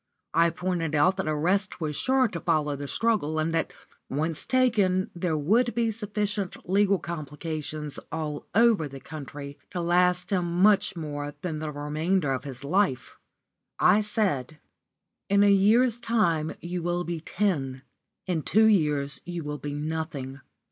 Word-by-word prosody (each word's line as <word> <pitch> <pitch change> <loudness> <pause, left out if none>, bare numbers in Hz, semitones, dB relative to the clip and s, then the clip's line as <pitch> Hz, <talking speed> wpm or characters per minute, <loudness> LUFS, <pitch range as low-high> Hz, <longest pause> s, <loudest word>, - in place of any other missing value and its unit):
I 170 +1 +4
pointed 170 -2 -2
out 180 +7 +3
that 190 - -2
arrest 180 +6 0
was 155 -3 -2
sure 260 - +2
to 175 -6 -5
follow 155 -4 +1
the 140 0 -6
struggle, 210 -7 0
and 155 +1 0
that, 165 - 0 0.4
once 155 +3 -1
taken, 210 -8 +2
there 170 -2 -1
would 220 +10 +2
be 230 -1 +1
sufficient 210 -3 -3
legal 200 +1 +3
complications 155 -2 -5
all 155 -2 -4
over 225 -8 +4
the 135 -1 -9
country 140 -1 -8
to 180 - -4
last 180 +2 +2
him 175 -2 0
much 205 -2 +4
more 145 -3 -5
than 160 -4 -3
the 155 -1 -4
remainder 150 +2 -1
of 130 0 -2
his 135 -1 -7
life. 180 -2 0 0.6
I 215 - +5
said: 190 - -1 0.7
"In 200 +1 +5
a 205 - +6
year's 225 +5 +4
time 175 -10 +1
you 175 +1 -4
will 175 +1 -1
be 170 -1 -4
ten; 140 -9 -1 0.4
in 175 -4 -1
two 220 +8 +4
years 150 -9 +2
you 175 -1 -5
will 150 0 -5
be 145 0 -5
nothing. 145 -3 -4
170 Hz, 155 wpm, -27 LUFS, 150-200 Hz, 0.7 s, a